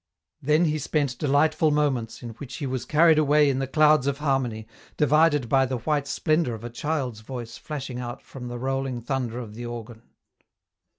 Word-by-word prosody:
Then 155 +5 +3
he 155 -1 0
spent 140 -3 -1
delightful 155 +2 +3
moments, 140 -7 0
in 120 - -5
which 130 +3 -9
he 145 - -4
was 130 -1 -3
carried 160 0 +5
away 150 -1 +4
in 130 - -1
the 135 - -2
clouds 155 -1 +4
of 140 -1 0
harmony, 130 -7 -1 0.3
divided 150 -2 +3
by 135 +2 +3
the 130 0 -2
white 145 +4 -1
splendour 155 -7 0
of 110 - -11
a 120 - -6
child's 130 -4 -2
voice 120 +1 -7
flashing 135 -5 -5
out 120 0 -6
from 125 -2 -9
the 120 0 -5
rolling 135 0 -2
thunder 120 -1 -3
of 115 -4 -7
the 120 +2 -6
organ. 120 -1 -8
135 Hz, 185 wpm, -25 LUFS, 120-150 Hz, 0.3 s, carried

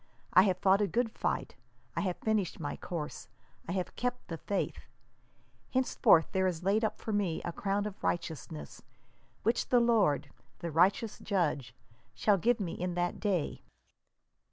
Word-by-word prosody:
I 185 - +9
have 180 - 0
fought 195 +2 +4
a 205 - +3
good 230 +2 0
fight, - - -2 0.4
I - - 0
have 185 -3 -1
finished 215 -5 0
my 145 -3 -3
course, 160 -4 -6 0.4
I - - -1
have 185 -1 -3
kept 250 0 -3
the 165 -2 -4
faith: 200 - -3 0.8
henceforth 255 -10 +4
there 190 -1 +2
is 175 -2 -2
laid 205 +4 +2
up 220 - 0
for 220 - -4
me 195 -6 0
a 175 - -2
crown 200 +3 -1
of 210 -1 -7
righteousness, 140 - -3 0.6
which 230 +3 +1
the 245 - +5
Lord, 225 - +3 0.3
the 170 - -5
righteous 195 +7 +2
Judge, 150 - -1 0.4
shall 205 -3 +3
give 235 +4 +2
me 180 -5 -3
in 180 0 -3
that 175 0 -1
day 190 -7 -1
190 Hz, 160 wpm, -31 LUFS, 170-215 Hz, 0.8 s, I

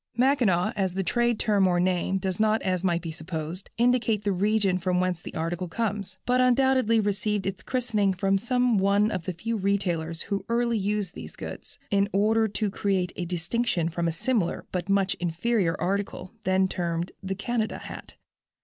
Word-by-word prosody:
"Mackinaw," 235 -8 +3
as 190 -2 -1
a 195 - +1
trade 240 +3 +1
term 200 -3 +3
or 175 -1 +2
name, 185 +1 +1
does 190 0 -3
not, 215 0 +3
as 185 -1 0
might 175 -2 +1
be 165 - -4
supposed, 160 +2 -6
indicate 235 -3 +2
the 205 - +1
region 195 0 +2
from 180 0 0
whence 180 -1 0
the - - -9
articles 170 +2 -2
comes, 200 -1 -3
but 250 +1 +3
undoubtedly 255 -2 +4
received 205 -1 0
its 190 -1 -3
christening 225 -6 0
from 195 +1 +1
some 245 -1 +2
one 200 +2 +3
of 175 -5 -3
the 185 - -1
few 225 +7 -3
retailers 175 -5 -1
who 200 -1 -2
early 235 -1 +1
used 205 -2 -1
these - - -9
goods, - - -7
in 200 0 +2
order 220 +3 +3
to 210 0 -2
create 190 -3 0
a 175 - -3
distinction 175 +1 0
from 170 0 -1
a - - +1
similar, 200 +1 -1
but 180 +1 -3
much 195 -1 +3
inferior 175 +1 0
article, 190 0 -2
then 190 0 +3
termed 170 -1 -2
the 195 0 -3
"Canada" 220 +2 -2
hat. - - -9
195 Hz, 180 wpm, -26 LUFS, 180-220 Hz, -, undoubtedly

